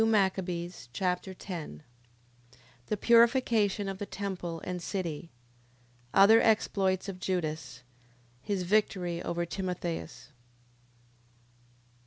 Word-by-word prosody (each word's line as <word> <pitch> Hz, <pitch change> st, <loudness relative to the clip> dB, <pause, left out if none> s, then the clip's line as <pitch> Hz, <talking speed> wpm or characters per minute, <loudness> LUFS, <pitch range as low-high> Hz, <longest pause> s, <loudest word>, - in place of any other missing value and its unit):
2 225 Hz, -, +4 dB
Machabees 185 Hz, -, 0 dB
Chapter 185 Hz, +4 st, -1 dB
10 160 Hz, -, -7 dB, 1.0 s
The 210 Hz, -, -1 dB
purification 230 Hz, -3 st, +4 dB
of 195 Hz, -1 st, -4 dB
the 205 Hz, -, -4 dB
temple 180 Hz, -4 st, -4 dB
and 180 Hz, -1 st, -4 dB
city. 170 Hz, -3 st, -4 dB, 0.8 s
Other 200 Hz, +8 st, +7 dB
exploits 195 Hz, -4 st, +2 dB
of 190 Hz, -2 st, -6 dB
Judas. 160 Hz, -7 st, -3 dB, 0.6 s
His 195 Hz, -3 st, -2 dB
victory 180 Hz, -3 st, +1 dB
over 170 Hz, -1 st, -2 dB
Timotheus. 180 Hz, -2 st, -4 dB
185 Hz, 95 wpm, -30 LUFS, 175-200 Hz, 1.0 s, Other